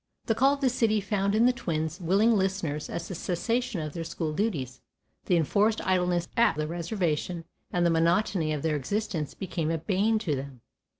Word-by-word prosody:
The 225 - +2
"Call 270 +5 +4
of 280 - -13
the 265 - +4
City" 225 -3 +2
found 200 0 0
in 225 +2 +4
the 250 - +5
twins 160 -5 -3
willing 200 +7 +3
listeners 190 -7 -1
as 170 0 -4
the - - -5
cessation 215 +4 -1
of 155 -1 -5
their 165 - -4
school 165 -1 -3
duties, 150 - -2 0.5
the 180 - +4
enforced 210 +7 +2
idleness 180 -2 +1
at 235 - +4
the 155 - -1
reservation, 170 0 -2 0.3
and 175 -1 +1
the 170 - +4
monotony 170 0 +2
of 150 -2 -2
their 160 -2 +1
existence 165 0 -2
became 170 -4 -3
a 165 - +1
bane 200 +7 +1
to 175 -9 -1
them. 135 -2 -7
175 Hz, 190 wpm, -28 LUFS, 160-210 Hz, 0.5 s, the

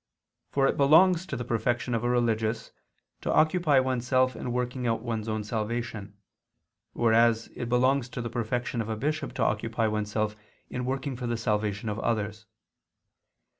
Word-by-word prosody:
For 135 -1 +2
it - - +1
belongs 170 +5 +5
to - - -4
the 120 - -4
perfection 120 +1 -1
of 115 0 0
a 120 - +1
religious 115 -2 0 0.5
to - - -1
occupy 155 -3 +4
oneself 130 0 +1
in 125 - -4
working 125 0 -2
out 115 -1 0
one's 115 -2 -3
own 110 -1 -2
salvation, 110 -2 -4 0.8
whereas 115 0 +3
it 120 -1 -4
belongs 125 +1 +2
to 125 - -5
the - - -3
perfection 120 +1 -2
of 110 - -5
a 110 - -2
bishop 150 +6 -2
to - - -1
occupy 115 +1 0
oneself 105 0 -1 0.4
in 125 0 -3
working 135 +1 -2
for 120 0 -4
the 120 0 -1
salvation 105 -1 -1
of 105 0 -2
others. 110 -1 -2
120 Hz, 165 wpm, -28 LUFS, 110-130 Hz, 0.8 s, belongs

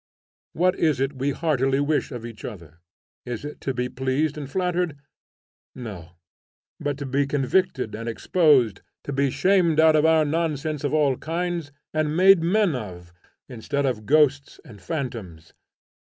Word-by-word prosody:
What 180 +2 +2
is 155 -5 +2
it 135 0 -2
we 135 +2 0
heartily 135 -3 +1
wish 145 +1 0
of 120 -3 -6
each 115 -2 -10
other? 85 -7 -9 0.4
Is 120 +2 -6
it 150 - -8
to 135 - -2
be 125 -1 -2
pleased 130 +4 -1
and 145 -3 -7
flattered? 180 -2 -1 0.8
No, 100 -9 -8 0.7
but 145 -1 -2
to 140 - -5
be 135 +1 0
convicted 140 - 0
and 115 +2 -4
exposed, 125 - +2 0.2
to 140 - -5
be 140 0 +1
shamed 175 0 +2
out 160 0 +6
of 150 - +3
our 160 -1 +4
nonsense 155 -1 -2
of 145 - 0
all 145 -4 +2
kinds, 170 -1 -3 0.2
and 155 0 0
made 190 -1 +6
men 190 +1 +2
of, 90 -7 -8 0.3
instead 135 +3 -3
of 115 -5 -2
ghosts 145 -1 +2
and 105 -4 -13
phantoms. 115 - -6
140 Hz, 155 wpm, -24 LUFS, 125-160 Hz, 0.8 s, out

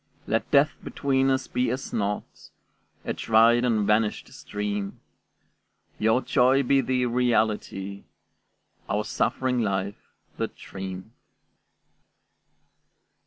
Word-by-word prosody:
Let 115 - -1
death 140 +1 +5
between 135 -1 +1
us 130 0 +1
be 125 0 0
as 130 +3 -4
naught, 105 0 -3 0.6
A - - -1
dried 115 +2 +4
and 110 -4 +2
vanished 105 +1 0
stream; 105 -1 -4 1.0
Your 110 +4 +2
joy 130 +2 +3
be 135 +1 +3
the 130 -1 0
reality, 110 -5 0 0.8
Our 105 - 0
suffering 125 +3 0
life 100 -1 -3 0.3
the - - -1
dream. 95 +2 -8
115 Hz, 100 wpm, -26 LUFS, 105-125 Hz, 1.0 s, death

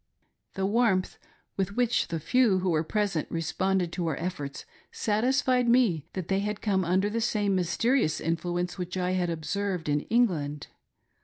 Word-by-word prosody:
The 195 - -1
warmth 205 -3 +1 0.4
with 195 +1 -1
which 245 -1 +1
the 165 - -3
few 230 +3 +3
who 185 -1 0
were 155 -1 +1
presfent 195 -3 -1
responded 180 +2 -1
to 175 -2 -2
our 155 - -1
efforts 150 -5 -5 0.3
satisfied 250 +3 +1
me 230 - +3
that 185 -3 -4
they 195 0 +1
had 205 0 -2
come 195 -3 +1
under 185 +3 +2
the 225 +2 -2
same 210 -3 +1
mysterious 190 - +1
influence 175 +3 -2
which 180 +1 -4
I 180 0 0
had 180 -1 0
observed 180 +2 -2
in 145 0 +2
England. 160 -12 0
190 Hz, 160 wpm, -28 LUFS, 170-210 Hz, 0.4 s, few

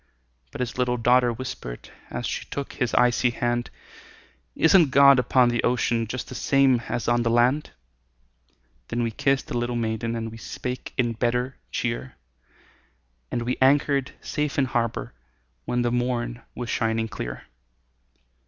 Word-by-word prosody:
But - - -6
his 125 0 -3
little 125 -1 +1
daughter 120 +1 +4
whispered, 115 - -7 0.2
As - - -4
she - - -3
took 140 -1 -5
his 125 -3 -1
icy 125 0 +4
hand, 120 0 -1 0.9
"Isn't 165 -2 +5
God 140 0 +7
upon 125 0 +4
the 120 -1 0
ocean, 120 -1 +1
Just 125 +3 -5
the - - -8
same 135 -3 +3
as 120 -1 -2
on 120 0 +3
the 115 - +1
land?" 125 +6 +2 1.2
Then 120 +1 -1
we 115 - -1
kissed 135 +3 +1
the - - -6
little 120 0 -2
maiden, 115 0 -2
And 115 -1 -4
we 115 - -9
spake 125 +2 -6
in 120 -3 +1
better 125 +3 -1
cheer, 65 +2 -3 1.1
And 120 - -2
we 125 +2 -1
anchored 140 0 +3
safe 150 -1 -2
in 140 - +3
harbor 120 -3 -2 0.5
When 125 0 0
the 120 - +1
morn 120 -1 -1
was 120 -1 -4
shining 115 -1 0
clear. 60 - -6
120 Hz, 155 wpm, -25 LUFS, 115-130 Hz, 1.2 s, God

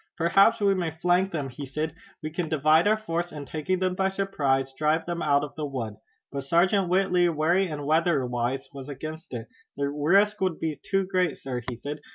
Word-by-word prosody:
"Perhaps 195 +7 +4
we 200 -1 +3
may 180 -3 -1
flank 175 +4 +1
them," 145 -5 -3
he 130 +3 -8
said. 150 +3 -3 0.3
"We 155 - -4
can 165 0 -3
divide 155 +3 +4
our 215 +1 +4
force, 175 -5 -3
and 145 -2 -7
taking 155 +6 -2
them 185 0 0
by 190 +1 +1
surprise 140 -9 0
drive 155 +3 +1
them 170 -1 -3
out 140 -1 +3
of 145 - -6
the 155 - -4
wood." 115 -7 -5 0.3
But 140 -1 -4
Sergeant 175 +5 +2
Whitley, 180 -1 +3
wary 170 +4 +2
and 150 -3 -5
weatherwise, 135 -5 +1
was 135 0 -8
against 155 +4 -7
it. 115 -3 -5 0.3
"The 140 0 0
risk 190 +9 +3
would 185 -4 0
be 160 -2 -3
too 195 -1 0
great, 185 -5 0
sir," 125 -2 -4
he 125 - -4
said. 145 +5 -6
160 Hz, 205 wpm, -26 LUFS, 140-185 Hz, 0.3 s, Perhaps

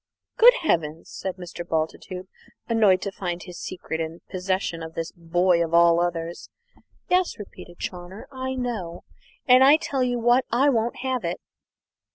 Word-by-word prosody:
"Good - - +8
heavens!" 160 - -1
said 190 -1 -5
Mr. 175 -1 -7
Bultitude, 170 +3 -3 0.4
annoyed 210 -5 +3
to 200 - -3
find 175 -3 -4
his 180 -1 -10
secret 165 -3 -5
in 165 +1 -5
possession 185 -2 -2
of 160 0 -8
this 165 0 -4
boy 170 +1 +1
of 165 0 -1
all 170 0 +6
others. 170 -1 -3 0.6
"Yes," 365 0 +1
repeated 180 -4 -11
Chawner. 180 +3 -7
"I 260 0 -4
know, 220 -9 -4 0.4
and 255 0 +7
I 285 +3 +7
tell 275 -4 -2
you 245 -1 0
what 240 +2 +3
I 265 +5 +4
won't 235 -2 0
have 255 -2 -1
it!" 170 +1 -3
185 Hz, 160 wpm, -24 LUFS, 170-245 Hz, 0.6 s, Good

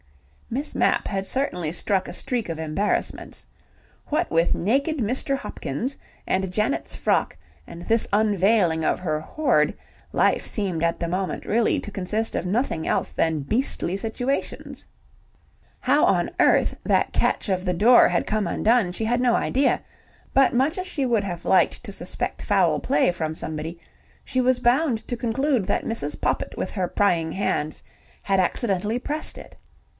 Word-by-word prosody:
Miss 275 +6 -3
Mapp - - +2
had 195 -1 -2
certainly 180 - -1
struck 190 +2 -1
a - - -7
streak 240 -7 -3
of 165 -1 -4
embarrassments. 160 +6 -2 0.6
What 305 - 0
with 165 +1 +3
naked 275 - 0
Mr. 260 +3 0
Hopkins, 250 - -4 0.3
and 190 -1 0
Janet's 215 +8 -1
frock - - 0 0.3
and 170 0 -9
this 225 +4 +1
unveiling 200 -5 +3
of - - +1
her 155 -4 -1
hoard, 310 - +1 0.4
life - - +2
seemed 185 -6 -2
at 170 0 +1
the 170 - -2
moment 185 +2 -3
really 230 +1 +2
to 210 - -8
consist 210 +4 -2
of - - -2
nothing 195 -5 -1
else - - -1
than 160 -2 0
beastly 205 - 0
situations. 245 +6 -3 0.9
How - - +3
on - - +2
earth - - +4
that - - +1
catch - - +1
of 185 -2 0
the 180 -2 0
door 230 +7 +6
had - - 0
come 215 -3 0
undone, 220 -1 +2
she 220 +5 -2
had 240 +2 +1
no 245 -2 +3
idea, 270 +1 +1 0.5
but 270 -1 +4
much 270 +8 +1
as 370 - -4
she 285 -7 -1
would 230 -5 +1
have 175 -3 -5
liked 190 - +3
to - - -6
suspect - - -3
foul - - +2
play 265 -8 +2
from 160 -3 -3
somebody, 160 +2 -5 0.5
she 255 - 0
was 255 0 +2
bound 245 -2 +1
to 245 - -2
conclude 245 0 0
that - - 0
Mrs. 185 -10 -3
Poppit - - -1
with - - -3
her 185 -4 -1
prying 170 -5 +1
hands 155 -6 -1 0.4
had 195 -1 +1
accidentally 205 +3 0
pressed 300 +4 -3
it. - - -12
210 Hz, 160 wpm, -24 LUFS, 175-245 Hz, 0.9 s, door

